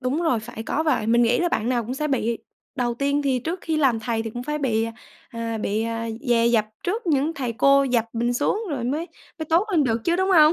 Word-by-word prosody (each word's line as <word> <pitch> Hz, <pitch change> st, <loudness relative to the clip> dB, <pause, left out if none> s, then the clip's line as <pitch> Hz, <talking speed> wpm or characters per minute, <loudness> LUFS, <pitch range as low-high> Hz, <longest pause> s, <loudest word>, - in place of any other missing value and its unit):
Đúng 275 Hz, +6 st, -1 dB
rồi, 250 Hz, -9 st, +1 dB
phải 220 Hz, 0 st, -8 dB
có 305 Hz, +7 st, -1 dB
vậy. 305 Hz, -9 st, +1 dB
Mình 235 Hz, +1 st, +4 dB
nghĩ 235 Hz, +1 st, +3 dB
là 350 Hz, -, +2 dB
bạn 230 Hz, -7 st, -1 dB
nào 245 Hz, -2 st, +1 dB
cũng 250 Hz, -, -4 dB
sẽ 300 Hz, +3 st, -2 dB
bị 235 Hz, -4 st, 0 dB, 0.4 s
đầu 245 Hz, -3 st, -1 dB
tiên 280 Hz, +3 st, 0 dB
thì 265 Hz, -2 st, +1 dB
trước 330 Hz, +9 st, -3 dB
khi 320 Hz, -1 st, -1 dB
làm 260 Hz, -7 st, +2 dB
thầy 225 Hz, 0 st, -1 dB
thì 225 Hz, -, -5 dB
cũng 245 Hz, +3 st, -6 dB
phải 300 Hz, +3 st, -3 dB
bị, 230 Hz, -5 st, +1 dB, 0.4 s
à, 230 Hz, -1 st, -4 dB
bị, 215 Hz, +1 st, -1 dB
à, 230 Hz, 0 st, -3 dB, 0.2 s
dè 235 Hz, -1 st, +4 dB
dập 225 Hz, -3 st, +3 dB, 0.2 s
trước 415 Hz, +4 st, -2 dB
những 310 Hz, 0 st, +1 dB
thầy 250 Hz, -5 st, -3 dB
cô 275 Hz, +4 st, +4 dB
dập 245 Hz, -4 st, +1 dB
mình 235 Hz, +1 st, 0 dB
xuống 345 Hz, -, 0 dB
rồi 255 Hz, -5 st, -2 dB
mới 300 Hz, +7 st, -1 dB, 0.3 s
mới 315 Hz, -, -4 dB
tốt 335 Hz, +7 st, +3 dB
lên 320 Hz, -7 st, +3 dB
được 230 Hz, -1 st, 0 dB
chứ, 340 Hz, -, +2 dB
đúng 375 Hz, +1 st, +1 dB
hông? 315 Hz, -3 st, +7 dB
255 Hz, 255 wpm, -23 LUFS, 230-305 Hz, 0.4 s, hông